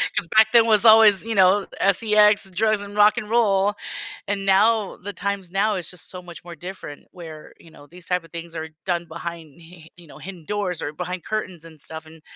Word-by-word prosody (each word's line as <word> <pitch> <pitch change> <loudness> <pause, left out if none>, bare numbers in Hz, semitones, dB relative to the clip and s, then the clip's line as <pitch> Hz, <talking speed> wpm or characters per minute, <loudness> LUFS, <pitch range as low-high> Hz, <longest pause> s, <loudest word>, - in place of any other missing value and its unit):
'Cause - - -1
back 220 0 +7
then 235 -2 +6
was 215 -2 +3
always, 220 -3 +7
you 225 0 -4
know, 195 +1 +4
S-E-X, 210 0 +3
drugs, 215 +1 +1
and 205 0 -9
rock 210 +2 +4
and 215 -3 -5
roll, 205 -3 +2 0.5
and 195 0 -2
now 210 +2 +3
the 200 +2 -8
times 200 -2 -4
now 205 +3 +1
is 180 -4 -5
just 180 -2 -9
so 180 - -8
much 175 -1 -12
more 175 -1 -10
different 175 -3 -10
where, 160 -4 -11
you 165 - -17
know, 145 - -16
these 175 +2 -13
type 180 -1 -1
of 165 - -18
things 170 0 -9
are 160 0 -5 0.2
done 175 -2 -1
behind 170 -2 -9
hi 165 - -16
hi 160 - -16
you 175 -1 -17
know, - - -14
hidden 185 -3 -10
doors 200 -4 -3
or 145 - -4
behind 180 +2 -6
curtains 185 -6 -5
and 160 -2 -15
stuff, 160 +2 -8
and, 160 0 -16
185 Hz, 225 wpm, -22 LUFS, 170-210 Hz, 0.5 s, back